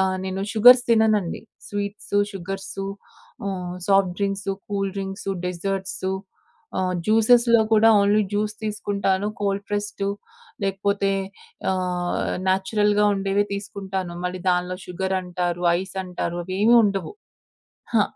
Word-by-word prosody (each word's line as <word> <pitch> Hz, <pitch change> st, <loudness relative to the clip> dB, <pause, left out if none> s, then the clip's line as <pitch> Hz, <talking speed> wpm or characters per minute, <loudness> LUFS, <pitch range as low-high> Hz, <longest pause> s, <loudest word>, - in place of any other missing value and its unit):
ఆహ్, 190 Hz, 0 st, +1 dB
నేను 190 Hz, 0 st, -3 dB
షుగర్స్ 245 Hz, +3 st, +8 dB
తిననండి. 215 Hz, -5 st, +2 dB, 0.3 s
స్వీట్సు, 205 Hz, 0 st, -2 dB
షుగర్సు 195 Hz, +1 st, -5 dB, 0.6 s
హ్మ్. 180 Hz, -2 st, -3 dB
Soft 195 Hz, -2 st, +4 dB
drinks, 195 Hz, -1 st, -1 dB, 0.2 s
cool 195 Hz, -1 st, -1 dB
drinks, 195 Hz, 0 st, -4 dB, 0.2 s
desserts 190 Hz, +1 st, -3 dB, 0.7 s
ఆహ్, 185 Hz, -1 st, 0 dB
జ్యూసెస్‌లో 230 Hz, +2 st, +5 dB
కూడా 220 Hz, +1 st, +6 dB
ఓన్లీ 205 Hz, +1 st, +3 dB
జ్యూస్ 210 Hz, +1 st, -1 dB
తీసుకుంటాను 200 Hz, -2 st, -1 dB
కోల్డ్ 200 Hz, 0 st, -1 dB
ప్రెస్‌డ్ 205 Hz, -1 st, -2 dB, 0.6 s
లేకపోతే 195 Hz, 0 st, 0 dB, 0.6 s
ఆహ్, 180 Hz, -1 st, -1 dB, 0.2 s
నేచురల్‌గా 205 Hz, +2 st, +2 dB
ఉండేవె 195 Hz, +1 st, +1 dB
తీసుకుంటాను, 195 Hz, -3 st, -5 dB
మళ్ళీ 180 Hz, 0 st, -3 dB
దానిలో 180 Hz, 0 st, 0 dB
షుగరంటారు. 180 Hz, -1 st, -2 dB, 0.2 s
ఐస్ 190 Hz, 0 st, -9 dB
అంటారు. 175 Hz, -1 st, -4 dB
అవి 185 Hz, +1 st, -5 dB
ఏమీ 230 Hz, +3 st, +6 dB
ఉండవు. 195 Hz, -2 st, -1 dB, 0.9 s
ఆ! -, -, +6 dB
195 Hz, 110 wpm, -23 LUFS, 185-205 Hz, 0.9 s, షుగర్స్